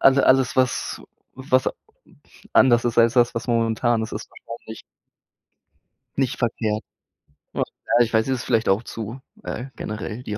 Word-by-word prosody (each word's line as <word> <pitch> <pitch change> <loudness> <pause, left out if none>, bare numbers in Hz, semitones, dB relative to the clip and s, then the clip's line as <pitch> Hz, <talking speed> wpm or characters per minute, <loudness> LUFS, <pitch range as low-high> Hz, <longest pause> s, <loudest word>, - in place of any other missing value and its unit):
Also 135 0 +6
alles 130 -1 +4
war 130 - +7
s 125 - -4 0.3
was 130 0 +1 0.8
anders 120 -2 +5
ist 120 -1 0
als 115 +1 +5
das, 120 -1 +4
was 115 - -3
momentan 115 0 +2
ist, 110 - -5
ist - - -6 0.2
wahrscheinlich 115 -1 -8 1.4
nicht 135 -2 0
verkehrt. 110 -3 -1 0.7
Ach, - - +1 0.4
ja, - - +7
ich 115 - -8
weiß, 110 +1 +3
es 130 -1 0
ist - - -5
vielleicht 115 -2 +2
auch 95 +4 +3
zu, 115 +2 -6 0.2
äh, 125 - -4
generell 110 +3 -5
die 105 -3 -4
120 Hz, 160 wpm, -23 LUFS, 110-130 Hz, 1.4 s, war